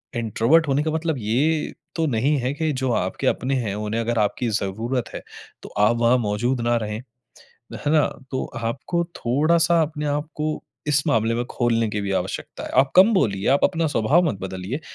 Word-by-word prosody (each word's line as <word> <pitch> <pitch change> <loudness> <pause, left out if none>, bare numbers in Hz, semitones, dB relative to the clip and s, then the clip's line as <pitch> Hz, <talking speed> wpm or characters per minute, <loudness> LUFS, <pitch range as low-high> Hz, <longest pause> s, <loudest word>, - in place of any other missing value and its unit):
Introvert 120 +8 +2
होने 140 +2 +1
का 155 - -1
मतलब 160 0 -1
ये 140 +9 0 0.2
तो 165 -2 +1
नहीं 135 +4 +1
है 125 +2 -1
कि 155 +1 -1
जो 130 -1 -1
आपके - - -1
अपने 135 +2 0
हैं 100 -2 -2
उन्हें 105 +2 -2
अगर 115 0 -1
आपकी 110 +3 0
ज़रूरत 115 +6 -2
है - - -6 0.4
तो - - -9
आप 105 +3 +4
वहाँ 120 +2 +4
मौजूद 120 +3 -1
ना 120 0 +1
रहें। 105 0 -4 0.7
है 145 - -2
ना? 155 -2 +4 0.2
तो 130 - -2 0.2
आपको 135 +9 -1
थोड़ा 150 +8 +2
सा 170 0 +3
अपने 150 -1 -3
आपको 150 +1 -2 0.3
इस 145 -1 +3
मामले 115 +1 +2
में 120 +1 -1
खोलने 115 -2 +1
की 105 - -2
भी 100 -1 -3
आवश्यकता 95 0 -4
है। - - -6
आप 135 - 0
कम 195 +5 +7
बोलिए, 100 - +1
आप 140 - +4
अपना 165 -3 +2
स्वभाव 145 +7 +3
मत 115 - -1
बदलिए 95 - -5
125 Hz, 195 wpm, -23 LUFS, 110-150 Hz, 0.7 s, कम